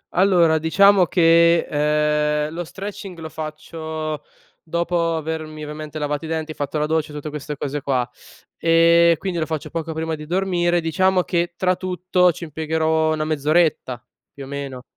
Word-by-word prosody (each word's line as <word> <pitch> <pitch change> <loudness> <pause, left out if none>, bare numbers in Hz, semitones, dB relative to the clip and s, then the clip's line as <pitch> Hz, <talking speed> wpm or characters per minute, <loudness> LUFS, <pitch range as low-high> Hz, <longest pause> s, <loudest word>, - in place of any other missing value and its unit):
Allora 175 -4 +4
diciamo 190 +3 +5
che, 170 0 +4
ehm, 150 0 +1
lo 175 - -4
stretching 195 0 -8
lo 160 -1 -7
faccio 155 -1 -6 0.4
dopo 170 0 -1
avermi, 155 -1 -5
ovviamente 150 0 -7
lavato 150 +1 -2
i - - -6
denti, 160 -1 -3
e - - -5
fatto 145 +1 -3
la 150 - +1
doccia, 155 0 0
e - - -10
tutte 150 +1 -5
queste 150 0 -6
cose 145 0 -3
qua, 130 -3 0 0.5
ehm, 170 0 +5
quindi 185 -3 -3
lo 155 - -1
faccio 160 -2 -4
poco 165 -1 -4
prima 160 0 -3
di 150 -1 -6
dormire; 175 -1 +1
diciamo 185 +3 +2
che, 175 -1 -1
tra 185 0 +2
tutto, 180 0 +1
ci 170 - -9
impiegherò 160 0 0
1 155 0 -2
mezz'oretta, 155 -4 0 0.3
più 140 - -9
o - - -9
meno. 140 -2 -6
160 Hz, 170 wpm, -21 LUFS, 150-170 Hz, 0.5 s, diciamo